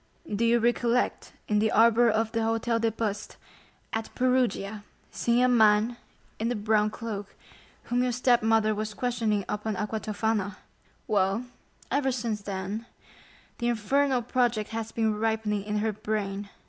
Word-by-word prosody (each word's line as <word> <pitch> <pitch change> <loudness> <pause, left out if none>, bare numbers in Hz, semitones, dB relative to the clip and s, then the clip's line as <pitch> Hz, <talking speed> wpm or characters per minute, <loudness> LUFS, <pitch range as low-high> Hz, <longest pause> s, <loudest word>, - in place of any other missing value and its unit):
"Do 220 - 0
you 230 +1 +4
recollect 240 +1 0
in 210 -1 +2
the 220 +1 +2
arbor 230 +1 +5
of 220 0 +1
the 230 - -1
Hôtel 225 +1 0
des 225 - +3
Postes, 215 -2 -4 0.6
at 220 0 -2
Perugia, 245 -5 0 0.3
seeing 240 +1 +2
a - - +5
man 220 -1 +4 0.4
in 230 +2 0
a - - 0
brown 210 0 +2
cloak, 215 -2 -6 0.5
whom 245 +1 0
your 250 0 +1
stepmother 225 -3 +3
was 215 0 -4
questioning 225 -5 0
upon 210 0 -2
aqua 215 +2 -2
tofana? 215 -2 -1 0.5
Well, 205 +1 +1 0.5
ever 275 -1 +2
since 225 -4 -2
then, 200 +3 -4 0.7
the 240 - 0
infernal 250 +3 +1
project 235 -3 0
has 225 0 -4
been 220 -2 0
ripening 220 -2 0
in 210 0 -1
her 220 - 0
brain." 205 -1 -3
220 Hz, 145 wpm, -27 LUFS, 210-235 Hz, 0.7 s, arbor